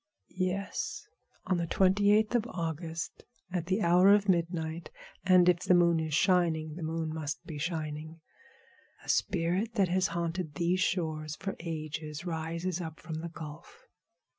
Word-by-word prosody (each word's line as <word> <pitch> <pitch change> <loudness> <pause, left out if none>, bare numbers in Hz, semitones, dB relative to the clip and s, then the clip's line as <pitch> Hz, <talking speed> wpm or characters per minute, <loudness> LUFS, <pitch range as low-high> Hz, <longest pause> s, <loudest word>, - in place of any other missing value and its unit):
"Yes. 185 +2 -2 0.4
On 185 - +1
the 170 -1 -1
twenty 195 +3 +4
eighth 215 +2 +3
of 240 -1 +1
August, 165 -3 -4 0.3
at 175 -2 -2
the 190 +3 +1
hour 180 +3 +6
of 205 0 +4
midnight, 170 -2 0 0.3
and 185 -1 +6
if 175 -1 +5
the 180 0 +3
moon 170 -1 +4
is 155 -2 -1
shining—the 165 -2 +2
moon 160 0 -2
must 155 -1 -4
be 155 -3 -6
shining—a 155 0 -4 0.9
spirit 190 +4 +1
that 195 -3 +3
has 185 +1 +2
haunted 170 -2 -3
these 175 +3 +1
shores 155 -5 -1
for 195 +3 -4
ages 155 -1 -5
rises 170 +2 -2
up 160 -1 -7
from 160 -1 -5
the 170 - -5
Gulf. 155 -2 -10
170 Hz, 145 wpm, -30 LUFS, 160-185 Hz, 0.9 s, hour